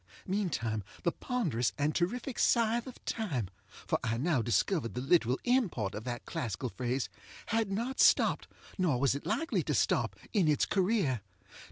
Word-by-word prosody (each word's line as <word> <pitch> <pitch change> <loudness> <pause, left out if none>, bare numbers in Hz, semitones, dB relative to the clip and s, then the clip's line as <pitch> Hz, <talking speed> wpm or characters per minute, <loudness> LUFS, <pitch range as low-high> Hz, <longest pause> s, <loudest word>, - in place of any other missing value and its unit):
Meantime 165 - -1 0.2
the 170 - +2
ponderous 165 - -1
and 145 +2 +1
terrific 240 +8 -1
Scythe 235 +1 +3
of 255 - -11
Time 145 - -2 0.4
(for - - 0
I 115 0 0
now 145 0 +1
discovered 120 - 0
the - - -1
literal 135 -3 +3
import 200 - +1
of 105 - -6
that 120 -1 -4
classical 120 +2 -3
phrase) 125 +2 -2 0.4
had 225 -2 +1
not 235 +7 -2
stopped, - - +4 0.3
nor 160 -9 +2
was 135 0 +3
it 140 - -5
likely 325 +11 0
to - - -1
stop, - - +1 0.2
in 195 -7 +3
its 150 -1 +3
career. 185 - +1
160 Hz, 160 wpm, -31 LUFS, -, 0.4 s, stopped